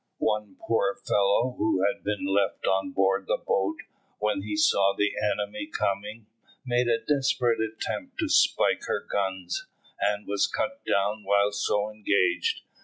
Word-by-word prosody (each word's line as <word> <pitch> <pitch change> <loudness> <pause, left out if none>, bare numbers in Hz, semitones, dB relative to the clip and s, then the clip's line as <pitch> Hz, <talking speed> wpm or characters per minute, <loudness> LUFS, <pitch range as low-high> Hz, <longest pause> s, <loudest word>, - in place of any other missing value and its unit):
One 105 -3 -1
poor 100 -4 0
fellow, 105 +5 +2
who 95 -4 +1
had 100 - -1
been 105 -1 -2
left 95 0 0
on 95 +7 +1
board 95 -4 +1
the - - +1
boat, 100 +2 -1 0.4
when 105 -2 0
he 105 +1 -4
saw 100 -1 +3
the 105 - +2
enemy 105 - -2
coming, 105 - -3 0.4
made 120 -1 +1
a 115 -1 +3
desperate 135 -4 +1
attempt 110 0 -4
to - - 0
spike - - +3
her - - -2
guns, 95 -2 -2 0.3
and 105 0 0
was 100 0 +1
cut 280 +1 -3
down 100 +2 +1
while 100 +1 +3
so 105 +1 0
engaged. 100 -4 +1
105 Hz, 150 wpm, -27 LUFS, 100-110 Hz, 0.4 s, saw